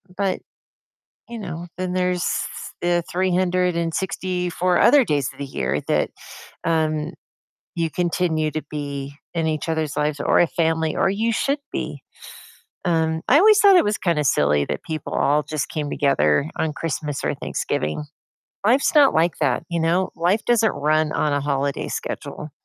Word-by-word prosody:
but, 195 -1 -1 0.9
you 235 -1 -6
know, 170 -4 -6
then 185 0 -3
there's 180 -1 0 0.6
the 175 0 +1
364 180 0 0
other 290 -2 +6
days 145 - 0
of - - -20
the 140 - -3
year 65 - -2
that, - - +1 0.5
um, 155 -2 0 0.6
you 165 -1 -1
continue 170 -2 0
to 155 +1 -4
be 140 -2 -5 0.2
in 165 -1 0
each 155 0 -2
other's 160 -3 -1
lives, 150 0 -1
or - - +3
a 175 - +5
family, 160 -1 0
or - - +2
you 220 +4 0
should 275 +6 0
be, - - -4 0.8
um, 160 -2 +1
I 280 - +6
always 425 +4 +6
thought 400 -3 +7
it - - +5
was 210 +1 0
kinda 165 -5 0
silly 75 - +2
that - - -4
people 155 -4 -5
all 150 +2 +2
just 155 -3 -3
came 150 -2 -3
together 140 - +2
on 160 - -1
Christmas 150 -2 -3
or - - 0
Thanksgiving, 75 - -3 0.6
life's 255 +9 +3
not 290 -3 +6
like 165 +1 +2
that, 135 -5 +1
you 170 -1 -1
know? 175 +3 +1
Life 180 +6 +1
doesn't 230 -3 +3
run 155 +1 +1
on 150 - 0
a 145 - +1
holiday 140 0 -1
schedule. 150 - -5
165 Hz, 160 wpm, -22 LUFS, 150-185 Hz, 0.9 s, thought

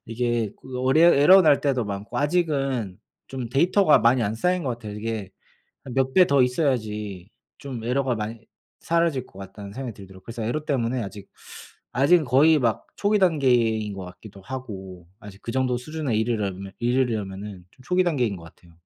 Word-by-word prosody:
이게 115 -1 -1
그 130 -1 -7
어레어 155 +7 +5
에러 185 +7 +7
날 145 -3 +4
때도 130 -5 0
많고 100 +1 -6
아직은 140 - 0 0.3
좀 130 -3 -6
데이터가 170 - +4
많이 120 +1 +3
안 105 +1 -1
쌓인 180 +6 0
것 135 - -3
같아요. 115 -3 -6
이게 105 -2 -5 0.6
몇 130 0 0
배 185 -2 +6
더 140 -2 +4
있어야지 105 - -1 0.3
좀 130 -5 -7
에러가 130 0 0
많이 110 +1 -5 0.4
사라질 165 -6 0
것 95 - -17
같다는 100 +1 -9
생각이 130 -1 -6
들더라고요. 95 -2 -13
그래서 115 -1 -6
에러 150 +7 -2
때문에 125 -4 -1
아직 100 0 -9 0.7
아직 155 +5 +4
거의 150 +5 +5
막 115 -4 -1
초기단계인 130 - +2
것 95 -1 -7
같기도 95 +2 -12
하고 95 -8 -8
아직 105 -1 -12
그 115 - -5
정도 130 -1 0
수준에 140 -2 -3
이르려면 100 -4 -2
이르려면은 105 -6 -2
좀 130 - -20
초기단계인 160 - +1
것 85 - -12
같아요. 85 +1 -18
120 Hz, 360 characters per minute, -24 LUFS, 105-140 Hz, 0.7 s, 에러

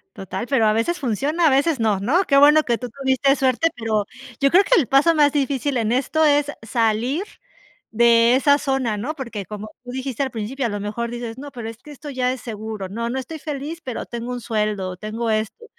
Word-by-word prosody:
Total, 195 +5 -5
pero 255 -6 +3
a 215 - +4
veces 230 +11 0
funciona, 285 - 0
a - - +5
veces 275 +3 +2
no, 215 -4 +1
¿no? 315 - +2
Qué 275 - +2
bueno 300 +2 +7
que 235 -2 0
tú 250 - -5
tuviste 275 +2 +1
suerte, 265 +5 +2
pero 220 -3 -1 0.3
yo 275 - +4
creo 380 +6 +5
que 445 -2 +4
el 260 - -2
paso 285 +5 +4
más 295 -2 +4
difícil 280 -1 -1
en 225 -1 0
esto 280 +5 +1
es 290 -1 +4 0.2
salir 230 - 0 0.7
de 235 +1 +5
esa 285 +2 +4
zona, 265 -7 -1
¿no? 275 +10 -4
Porque 235 -8 -6
como 210 +3 -8
tú 245 - -11
dijiste 260 0 -4
al 270 - 0
principio, 240 +3 -4
a - - 0
lo 205 -1 -4
mejor 215 +3 -3
dices: 240 0 -6
"No, 285 +1 -7
pero 235 -3 -6
es 225 - -9
que 295 +5 -16
esto 290 0 -9
ya 255 -1 0
es 260 -2 -6
seguro. 215 -3 -6
No, 230 +4 -3
no 260 - -3
estoy 285 +5 -6
feliz, 300 +3 -5
pero 250 -3 -5
tengo 235 +1 -6
un 245 -1 -4
sueldo, 210 -5 -2
tengo 220 +3 -3
esto". 215 - -2
250 Hz, 225 wpm, -21 LUFS, 225-280 Hz, 0.7 s, bueno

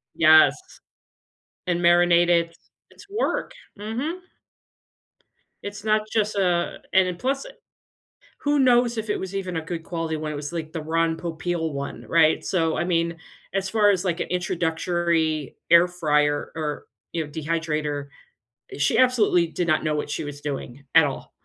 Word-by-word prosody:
Yes, 155 0 +6 1.1
and 175 -1 0
marinated 175 -1 +4 0.4
it's - - -16
work, 430 +4 -1 0.3
mhm. 245 - -4 1.4
It's 205 +1 -7
not 215 0 +2
just 215 -1 0
a 180 -3 0 0.2
and 190 -1 +5
then 180 - -3
plus 270 +4 -2 0.9
who 290 0 +1
knows 245 -2 +3
if 220 0 -4
it 210 - 0
was 190 +1 -6
even 185 -3 -3
a - - -2
good 165 +1 -6
quality 165 -2 -3
one, 155 0 -4
it - - -5
was 145 +3 -6
like 160 -2 -4
the 160 - -4
Ron 165 +1 0
Popeil 165 -1 -3
one, 140 0 -6
right? 160 -1 +3
So, 165 -4 0
I 170 - 0
mean, 170 -1 0 0.4
as 195 0 -1
far 210 0 +4
as, 195 -2 +1
like, 175 -3 -1
an - - -2
introductory 170 -4 -1 0.2
air 170 +1 +7
fryer 150 -4 0
or 150 -2 -4 0.3
you 165 -2 -1
know, - - -12
dehydrator, 150 -2 -2 0.7
she 145 - +2
absolutely 225 -9 +4
did 170 +2 -3
not 155 -2 +2
know 155 -1 0
what 150 0 -3
she - - -3
was 145 -1 -7
doing 140 -2 -5
at - - +7
all. - - -6
170 Hz, 160 wpm, -24 LUFS, 155-190 Hz, 1.4 s, air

